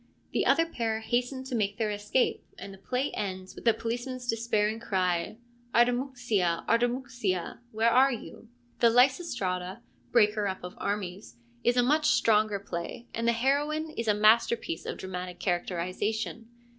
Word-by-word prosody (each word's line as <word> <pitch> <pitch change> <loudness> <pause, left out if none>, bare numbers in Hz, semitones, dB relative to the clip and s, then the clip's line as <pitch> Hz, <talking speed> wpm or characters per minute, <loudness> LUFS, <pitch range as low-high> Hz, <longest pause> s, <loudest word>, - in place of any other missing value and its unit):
The - - +1
other 330 - +4
pair 225 -8 -2
hasten 245 +3 -1
to 260 0 -7
make 205 -3 0
their 220 -2 0
escape, 210 +5 0
and 195 - -8
the 195 - -14
play 255 +7 -2
ends 190 -2 -4
with - - -12
the 230 - +6
policeman's 245 +2 -4
des 230 0 -2
pairing 215 +1 +2
cry, 185 -3 -1 0.4
Artamouxia, 240 -7 +1
Artamouxia, 240 -5 0
where 225 +2 +2
are 265 +3 +5
you? 230 -1 -8 0.2
' 240 - -36
The 235 - +6
Lysistrata, 230 - +1
' - - -35
breaker 210 -3 +3
up 190 -2 -4
of 180 - -6
armies,' 200 - -4 0.3
is 245 +1 +2
a 245 - +5
much 300 +4 +3
stronger 215 -6 +3
play, 200 +5 -6
and 230 +1 -1
the - - +5
heroine 290 +6 0
is 230 -6 -4
a 210 - +4
masterpiece 215 -4 +3
of - - -4
dramatic 180 -1 -6
characterisation. 185 +5 -2
225 Hz, 160 wpm, -28 LUFS, 200-245 Hz, 0.4 s, the